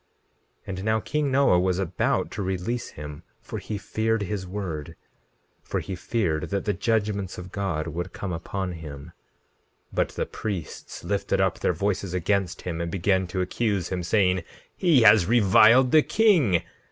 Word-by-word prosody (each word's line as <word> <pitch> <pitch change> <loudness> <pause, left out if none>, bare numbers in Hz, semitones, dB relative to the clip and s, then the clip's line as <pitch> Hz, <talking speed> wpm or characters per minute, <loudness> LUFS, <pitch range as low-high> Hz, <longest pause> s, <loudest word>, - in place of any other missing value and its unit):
17:11 - - -34
And 95 0 -4
now 110 +1 +2
king 145 +4 -1
Noah 135 -9 +4
was 90 0 +1
about 90 -2 0
to 100 - -4
release 95 +6 -2
him, 75 +1 -9 0.2
for - - -6
he 105 - -5
feared 110 +1 -1
his 95 -1 -4
word; 85 -5 -5 0.7
for - - -3
he 95 - -5
feared 90 -5 -1
that 100 -1 -2
the 105 - +1
judgments 100 -2 -1
of 90 0 -8
God 95 -6 -2
would 85 +3 -4
come 95 -3 -5
upon 95 +3 -4
him. 75 -4 -9 0.8
17:12 - - -21
But - - +1
the - - -3
priests 100 -8 -6
lifted - - -1
up - - +1
their - - +1
voices 100 -2 -2
against 95 0 0
him, 85 -2 -3
and 85 - -2
began 95 0 +1
to 95 +1 -2
accuse 100 -1 -1
him, 90 -1 -2
saying: 90 0 +2 0.3
He 160 -10 +4
has 105 -5 +7
reviled 115 +3 +6
the 155 - +7
king. 160 - +3
95 Hz, 170 wpm, -25 LUFS, 90-110 Hz, 0.8 s, has